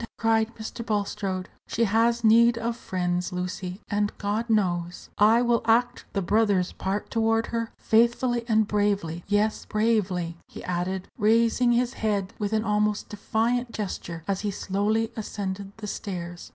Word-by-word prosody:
cried 225 Hz, -1 st, +2 dB
Mr. 220 Hz, +1 st, -6 dB
Bulstrode; 200 Hz, -3 st, -2 dB, 0.2 s
"she 230 Hz, -, 0 dB
has 230 Hz, +2 st, +2 dB
need 230 Hz, +2 st, +6 dB
of 230 Hz, 0 st, -2 dB
friends, 180 Hz, -5 st, -2 dB
Lucy; 180 Hz, +1 st, -4 dB
and, 205 Hz, 0 st, 0 dB
God 210 Hz, +3 st, -2 dB
knows, 180 Hz, -5 st, 0 dB
I 225 Hz, +3 st, +6 dB
will 240 Hz, -1 st, +2 dB
act 240 Hz, +2 st, +2 dB
the 195 Hz, -, 0 dB
brother's 200 Hz, -2 st, +2 dB
part 195 Hz, +2 st, -3 dB
toward 225 Hz, 0 st, +2 dB
her, 230 Hz, -1 st, -3 dB
faithfully 235 Hz, +2 st, +2 dB
and 220 Hz, -2 st, +3 dB
bravely. 200 Hz, -6 st, 0 dB
Yes, 210 Hz, +1 st, +1 dB
bravely," 200 Hz, -6 st, 0 dB
he -, -, -10 dB
added, 180 Hz, +1 st, -2 dB
raising 230 Hz, +3 st, +3 dB
his 245 Hz, +1 st, +1 dB
head 205 Hz, -5 st, -1 dB
with 205 Hz, -1 st, -1 dB
an 220 Hz, 0 st, +1 dB
almost 210 Hz, -1 st, 0 dB
defiant 230 Hz, +3 st, -1 dB
gesture 175 Hz, -5 st, -5 dB
as 195 Hz, -1 st, 0 dB
he 210 Hz, -, -1 dB
slowly 205 Hz, +4 st, 0 dB
ascended 200 Hz, -2 st, -4 dB
the 220 Hz, -, -7 dB
stairs. 175 Hz, -4 st, -6 dB
210 Hz, 150 wpm, -26 LUFS, 190-225 Hz, 0.2 s, need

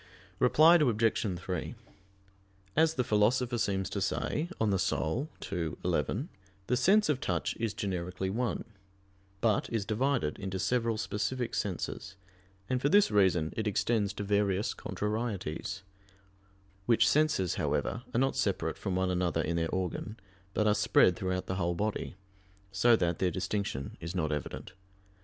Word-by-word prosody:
Reply 155 Hz, +7 st, +6 dB
Obj. 115 Hz, -, +1 dB
3: 90 Hz, -2 st, -4 dB, 1.0 s
As 160 Hz, +1 st, +3 dB
the 125 Hz, -, +1 dB
Philosopher 120 Hz, +2 st, +2 dB
seems 95 Hz, -3 st, 0 dB
to 100 Hz, -, -2 dB
say 155 Hz, -, -1 dB
(De 195 Hz, -, -10 dB
Anima 95 Hz, -, 0 dB, 0.3 s
ii, 85 Hz, -4 st, -2 dB
11), 135 Hz, +11 st, -1 dB, 0.4 s
the 125 Hz, -, +1 dB
sense 195 Hz, -, +4 dB
of 140 Hz, -3 st, 0 dB
touch 85 Hz, -4 st, -1 dB
is 110 Hz, -2 st, -2 dB
generically 95 Hz, -2 st, -3 dB
one, 120 Hz, +3 st, -2 dB, 0.8 s
but 110 Hz, -3 st, +2 dB
is 110 Hz, -4 st, -1 dB
divided 115 Hz, -, 0 dB
into 95 Hz, -1 st, -4 dB
several 115 Hz, +1 st, 0 dB
specific 115 Hz, +4 st, -2 dB
senses, 100 Hz, 0 st, -3 dB, 0.5 s
and 130 Hz, -1 st, 0 dB
for 145 Hz, -, +2 dB
this 205 Hz, -, +5 dB
reason 95 Hz, -6 st, +3 dB
it 110 Hz, -1 st, -2 dB
extends 105 Hz, 0 st, +1 dB
to 105 Hz, -, -5 dB
various 100 Hz, -1 st, +1 dB
contrarieties; 100 Hz, -4 st, -3 dB, 1.0 s
which 115 Hz, -2 st, +4 dB
senses, 150 Hz, -, +2 dB
however, 115 Hz, -, -1 dB
are 115 Hz, -, +1 dB
not 135 Hz, +1 st, +1 dB
separate -, -, -1 dB
from 95 Hz, -, -2 dB
one 95 Hz, 0 st, +1 dB
another 90 Hz, -3 st, 0 dB
in 85 Hz, -, -1 dB
their 80 Hz, -1 st, 0 dB
organ, 95 Hz, +4 st, -3 dB, 0.4 s
but 110 Hz, -, +2 dB
are 105 Hz, -, +4 dB
spread 105 Hz, -3 st, +4 dB
throughout 90 Hz, 0 st, -2 dB
the 95 Hz, -, -3 dB
whole 85 Hz, -2 st, 0 dB
body, 105 Hz, 0 st, -2 dB, 0.6 s
so 115 Hz, +5 st, +5 dB
that 85 Hz, -5 st, 0 dB
their 95 Hz, -, +2 dB
distinction 90 Hz, -6 st, -3 dB
is 85 Hz, +3 st, -5 dB
not 80 Hz, -4 st, 0 dB
evident. 75 Hz, +4 st, -5 dB
105 Hz, 145 wpm, -30 LUFS, 90-120 Hz, 1.0 s, Reply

